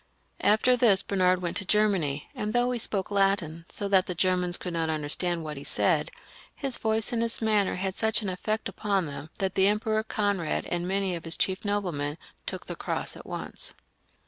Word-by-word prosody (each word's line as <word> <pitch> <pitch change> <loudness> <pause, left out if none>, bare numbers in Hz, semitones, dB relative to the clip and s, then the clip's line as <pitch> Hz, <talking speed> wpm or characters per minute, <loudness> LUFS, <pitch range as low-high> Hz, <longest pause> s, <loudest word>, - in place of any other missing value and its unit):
After 220 +5 +4
this 210 -6 +4
Bernard 185 -2 +2
went 170 - -1
to - - -2
Germany, 185 -9 +2
and 210 +1 -3
though 245 +1 +2
he 245 - -1
spoke 200 -3 -2
Latin, 195 -5 +1
so 200 - -3
that 190 -2 +4
the 180 - -2
Germans 180 0 +2
could 180 - -5
not 165 -1 0
understand 160 +3 -1
what 150 -2 -5
he 140 - -7
said, - - +2 0.5
his 270 -4 -2
voice 220 0 +1
and 230 - +1
his 230 0 -1
manner 215 -3 +2
had 190 +1 -2
such 220 +2 +2
an 200 - -1
effect 215 +4 -2
upon 200 -4 0
them, 145 +1 -7
that 190 -2 -1
the 190 0 +4
Emperor 215 +1 +1
Conrad 205 -6 -1
and 175 0 -2
many 195 0 0
of 165 - -6
his 165 - 0
chief 190 -1 0
noblemen 175 -8 -1 0.3
took - - -3
the - - -6
cross - - -2
at - - -11
once. - - -3
195 Hz, 200 wpm, -28 LUFS, 175-215 Hz, 0.5 s, After